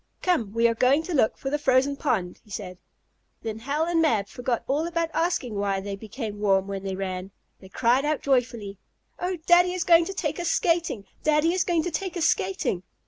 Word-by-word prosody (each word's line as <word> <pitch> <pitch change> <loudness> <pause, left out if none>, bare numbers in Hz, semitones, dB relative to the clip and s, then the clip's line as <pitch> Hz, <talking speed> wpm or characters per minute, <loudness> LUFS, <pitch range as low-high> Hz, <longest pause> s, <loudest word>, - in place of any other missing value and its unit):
"Come, 290 - +1
we 230 +1 +4
are 230 - +1
going 260 +6 +3
to 360 - -5
look 255 -7 +2
for 270 - -4
the 295 - 0
frozen 270 0 +2
pond!" 190 -11 -1
he 215 - -23
said. 185 -3 -7 0.6
Then 220 -1 -4
Hal 285 +7 -1
and 335 -1 +1
Mab 220 -10 +1
forgot 245 -1 -2
all 295 +5 0
about 335 -1 -1
asking 330 -9 0
why 200 -1 -1
they 200 +1 -5
became 215 0 -6
warm 195 -2 +2
when 195 -1 -5
they 195 -1 -4
ran. 185 -1 -4 0.3
They 190 - -14
cried 245 +6 +2
out 300 0 -1
joyfully: 240 -7 0 0.4
"Oh, 360 +1 -2
Daddy 355 +1 +5
is 365 - -1
going 335 -1 +5
to 390 - -5
take - - -2
us 345 -1 -1
skating! 335 - 0 0.2
Daddy 305 +2 +3
is 370 -1 +2
going 340 -3 +1
to 355 - -3
take 370 +2 -3
us 335 - +1
skating!" 185 - 0
260 Hz, 210 wpm, -25 LUFS, 205-330 Hz, 0.6 s, Daddy